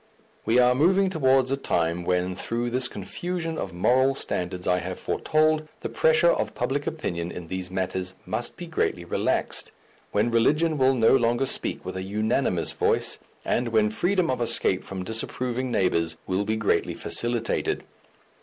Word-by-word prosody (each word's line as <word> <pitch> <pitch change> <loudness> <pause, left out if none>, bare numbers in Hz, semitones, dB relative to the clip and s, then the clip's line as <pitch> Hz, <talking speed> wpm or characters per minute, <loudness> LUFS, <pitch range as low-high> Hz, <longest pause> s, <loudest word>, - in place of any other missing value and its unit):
We 115 - +4
are 125 0 +5
moving 185 +8 +3
towards 135 -5 +3
a - - +3
time 85 -9 -1
when, 90 +1 0
through 120 +5 -2
this 125 0 +1
confusion 165 - -4
of 95 - -4
moral 130 +9 +3
standards 90 -6 -3
I 90 0 +2
have 90 +1 -5
foretold, 155 0 +1
the - - -3
pressure - - +4
of - - -2
public 140 +2 -2
opinion 90 - -3
in 85 -2 -8
these 95 -1 -4
matters 95 0 -3
must 120 - -3
be 175 - -6
greatly 125 - -1
relaxed, - - -1 0.4
when 110 +3 +1
religion 150 +7 +2
will 130 0 +4
no 115 +1 +5
longer 120 +1 +2
speak - - -1
with 90 - -5
a 95 - -3
unanimous 105 -1 0
voice, - - +1 0.3
and 120 - 0
when 110 -2 +2
freedom 180 - +1
of 125 - -2
escape 95 -5 +1
from 95 -1 -6
disapproving 125 +4 -2
neighbours 85 -7 +1
will 95 +2 -1
be 110 - 0
greatly 105 -1 0
facilitated. 120 -1 -1
120 Hz, 165 wpm, -25 LUFS, 95-135 Hz, 0.4 s, are